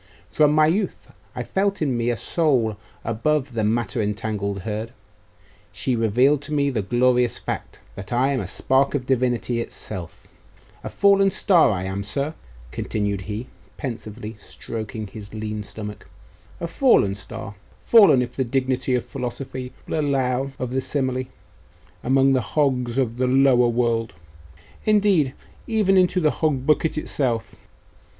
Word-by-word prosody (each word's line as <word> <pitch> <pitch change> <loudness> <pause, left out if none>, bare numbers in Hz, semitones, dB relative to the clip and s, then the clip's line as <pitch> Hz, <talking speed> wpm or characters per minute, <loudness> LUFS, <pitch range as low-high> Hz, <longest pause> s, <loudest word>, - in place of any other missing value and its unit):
From 150 -1 +4
my 155 0 +5
youth 185 +5 -1 0.2
I - - -3
felt 200 +1 0
in 140 -5 0
me 120 0 0
a 120 - 0
soul 130 -11 +1 0.3
above 130 +4 0
the 110 -2 -1
matter 115 +2 0
entangled 105 -1 -2
herd. 110 +3 -4 0.8
She 130 - -1
revealed 125 +6 +3
to 150 +1 -6
me 140 -1 +2
the 115 -5 -1
glorious 120 +3 +2
fact, - - -6
that 95 - -8
I 130 +3 +2
am 135 - 0
a - - -4
spark 135 +2 +1
of 130 -3 -2
Divinity 125 -2 0
itself. 100 -3 -8 0.6
A - - -4
fallen 200 -1 +4
star, 185 -3 +4
I 95 -3 -1
am, 95 +1 -3
sir!' 140 +10 -2 0.4
continued 100 -2 -2
he, 105 +4 -4 0.3
pensively, 110 -3 -6
stroking 110 +1 -6
his 105 +1 -10
lean 110 0 -4
stomach 105 0 -8 0.5
'a - - -3
fallen 165 - +3
star! 105 +1 -8 0.3
fallen, 200 - +7
if 120 0 -8
the 130 - +1
dignity 130 0 0
of 125 - -1
philosophy 130 0 -5 0.2
will - - -1
allow 135 -2 0
of 125 -1 -4
the 130 +1 0
simile, 130 -2 -1 0.8
among 135 +1 +4
the 130 - +2
hogs 125 -3 0
of 120 -3 0
the 130 0 +1
lower 130 -1 +5
world 115 -3 0 0.7
indeed, 200 -10 +3 0.3
even 215 -4 +2
into 185 0 +4
the 155 -4 +3
hog 140 -5 -1
bucket 155 +1 +2
itself. 120 -7 -1
125 Hz, 150 wpm, -23 LUFS, 110-140 Hz, 0.8 s, fallen